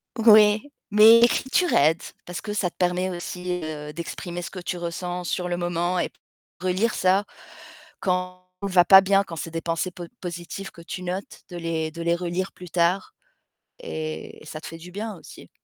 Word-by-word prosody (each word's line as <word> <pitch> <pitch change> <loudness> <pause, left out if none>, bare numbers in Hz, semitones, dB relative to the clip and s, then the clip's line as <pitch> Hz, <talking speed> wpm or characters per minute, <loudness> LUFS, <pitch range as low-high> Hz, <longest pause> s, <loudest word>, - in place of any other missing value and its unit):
Ouais, 215 -1 +7 0.3
mais 220 +2 +8
l'écriture 265 +8 +3
aide 155 +3 +4 0.2
parce 175 -1 -6
que 215 - -5
ça 185 -4 0
te - - -43
permet 180 +1 +1
aussi, 180 0 -4
heu, 150 -1 -6
d'exprimer 170 +2 -5
ce 175 - -6
que - - -11
tu 180 0 -4
ressens 175 +1 -4
sur 180 +1 -1
le 175 0 -1
moment 175 +1 0
et - - 0 0.5
relire 185 +5 0
ça 185 +2 +3 0.8
quand 180 0 -2
on 200 - -3
va 180 -2 +5
pas 190 +1 +9
bien, 195 +1 +3
quand 170 -4 -8
c'est 165 +2 -5
des 165 - -2
pensées 165 +2 -2
po 175 - -9 0.2
positives 175 +2 -6
que 170 - -13
tu 180 +2 -6
notes 185 +2 -5
de 175 - -7
les 165 -2 -2
de 170 - -6
les 170 0 +2
relire 180 +2 -2
plus 180 - -11
tard 175 +3 +1 0.7
et 155 - -5
ça 155 0 -7
te - - -8
fait 165 - -8
du 175 +2 -11
bien 210 +1 -5
aussi. - - -13
180 Hz, 190 wpm, -24 LUFS, 170-190 Hz, 0.8 s, pas